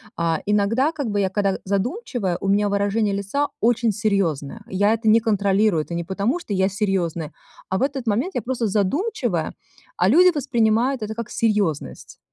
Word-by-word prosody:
А, 165 -1 0
иногда 215 +9 +2
как 280 -7 -3
бы 205 - 0
я, 195 -1 +1
када 195 0 0
задумчивая, 200 - -2
у 195 - -4
меня 205 +1 +2
выражение 200 +1 0
лица 200 +9 -1
очень 235 0 +2
серьезное. 200 - -1
Я 205 +2 +2
это 225 -1 0
не 225 - +6
контролирую, 200 -5 +2
это 170 - -8
не 170 0 -3
потому, 205 - -1
что 210 - -5
я 190 0 +2
серьезная, 185 -6 -2 0.4
а 190 - 0
в - - -4
этот 270 -3 -2
момент 240 - 0
я - - 0
просто 240 -1 -2
задумчивая, 215 - -1 0.4
а 180 - +3
люди 355 - +6
воспринимают 240 -2 +1
это 215 +1 -4
как 235 -2 -5
серьезность. 205 -9 -1
210 Hz, 175 wpm, -22 LUFS, 195-235 Hz, 0.4 s, не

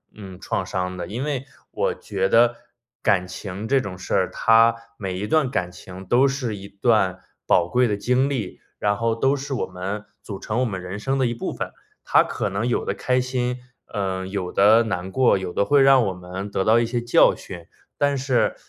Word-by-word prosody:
嗯， 95 -3 -10
创 95 - -2
伤 90 -1 -3
的。 90 - -4
因 115 +8 -4
为 140 -3 -2 0.3
我 - - 0
觉 95 -2 -2
得 120 +1 +4 0.5
感 95 -3 +2
情 100 +3 -6
这 135 +1 +3
种 95 -5 -6
事 95 - -6
儿， 95 - +2
它 115 +1 +4 0.2
每 95 -3 -4
一 105 - -2
段 155 -2 +2
感 90 -6 -2
情 95 +1 -11
都 125 +8 +4
是 130 -5 -2
一 100 0 -9
段 100 -2 +1 0.3
宝 85 - +4
贵 125 +6 +2
的 105 - -1
经 125 +6 +1
历， 120 -9 -4 0.2
然 105 0 +1
后 115 +1 0
都 135 +4 +2
是 140 0 -5
我 - - -1
们 95 +3 -5 0.2
组 100 -3 -6
成 105 +4 -2
我 - - +2
们 95 -6 -3
人 90 +3 -6
生 135 +5 -1
的 130 - +2
一 120 - 0
部 115 - -4
分。 - - -5 0.3
它 - - +5
可 - - -3
能 100 +5 -2
有 125 - 0
的 - - -1
开 125 0 0
心， 125 -1 -1 0.3
呃， 95 -3 -2
有 95 -2 -4
的 110 +4 +5
难 95 -4 -3
过， 130 -2 +3
有 95 -1 -5
的 100 - +1
会 145 +2 +4
让 135 -3 +6
我 95 - -1
们 90 +2 -7
得 95 - 0
到 110 +3 +4
一 115 - +1
些 120 +1 -2
教 120 0 +5
训。 85 -3 -10 0.3
但 145 -1 +1
是， 130 -2 +1
105 Hz, 230 characters per minute, -23 LUFS, 95-125 Hz, 0.5 s, 让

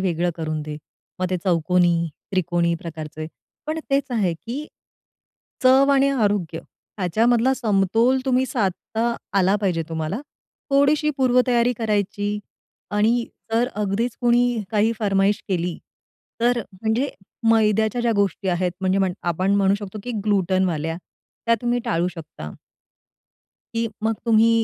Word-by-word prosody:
वेगळं 175 -2 0
करून 155 -1 -3
दे. 150 0 -6 0.4
मग 185 - 0
ते 185 - +1
चौकोनी, 175 -1 +2 0.2
त्रिकोणी 175 -2 +1
प्रकारचे. 155 -1 -6 0.4
पण 310 +1 -2
तेच 275 0 +1
आहे, 210 -7 +1
की 245 - -6 1.0
चव 265 +2 +6
आणि 275 0 +4
आरोग्य 205 - 0 0.4
ह्याच्यामधला 230 +7 +3
समतोल 225 +2 +2
तुम्ही 260 0 +2
साधता 225 +1 -1 0.2
आला 190 +1 +3
पाहिजे 185 -5 0
तुम्हाला. 160 +7 -3 0.5
थोडीशी 285 +2 +3
पूर्वतयारी 250 -2 +3
करायची 210 -2 -1 0.5
आणि 225 +3 +2 0.3
जर 235 +2 +2
अगदीच 210 +3 -1
कोणी 240 -2 +3
काही 220 +1 +2
फरमाईश 200 -1 +2
केली 175 -2 -1 0.6
तर 240 +1 +3
म्हणजे 220 +8 -1 0.4
मैद्याच्या 220 +1 +3
ज्या 235 -1 +2
गोष्टी 200 -1 0
आहेत, 180 0 0
म्हणजे 190 0 +1 0.3
आपण 185 +4 +1
म्हणू 195 -1 +3
शकतो 205 0 -7
की 245 - -5
ग्लुटेनवाल्या 185 -5 +1 0.5
त्या 230 - +5
तुम्ही 240 0 +1
टाळू 170 +2 +1
शकता. 160 - -9 1.2
की 230 0 0
मग 225 +1 +1
तुम्ही 225 0 +5
205 Hz, 125 wpm, -22 LUFS, 180-240 Hz, 1.2 s, चव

